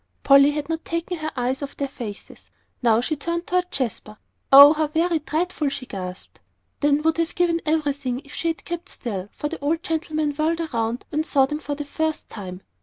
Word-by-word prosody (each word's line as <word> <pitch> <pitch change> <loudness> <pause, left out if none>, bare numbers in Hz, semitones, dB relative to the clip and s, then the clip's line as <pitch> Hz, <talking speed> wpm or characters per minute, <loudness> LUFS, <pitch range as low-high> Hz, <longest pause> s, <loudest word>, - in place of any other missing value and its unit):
Polly 275 +1 +7
had 295 -1 -3
not 325 0 -3
taken 335 +1 -3
her 310 0 -3
eyes 255 +3 -1
off 280 -1 -6
their 280 - -1
faces. 225 -6 -9 0.3
Now 230 -2 +4
she 310 +5 -1
turned 340 +4 -3
toward 360 0 0
Jasper. 230 -7 -4 0.3
"Oh, 280 +2 +11
how 310 -1 0
very 325 +2 +1
dreadful!" 310 0 -1
she 270 -1 -6
gasped 185 -4 -7 0.4
then 290 0 +2
would 320 0 +2
have 330 0 -1
given 340 -2 +2
everything 285 -5 0
if 280 - -13
she 335 - -2
had 325 -1 -2
kept 345 0 -5
still, 200 -5 -5
for 295 - -4
the 325 +2 -6
old 315 +4 -1
gentleman 310 -2 -1
whirled 315 +3 0
around 240 -6 -2
and 310 0 0
saw 280 -4 +3
them 300 +2 -4
for 290 -2 -4
the 295 0 -5
first 315 +2 -2
time. 185 -3 -8
295 Hz, 200 wpm, -23 LUFS, 265-325 Hz, 0.4 s, Oh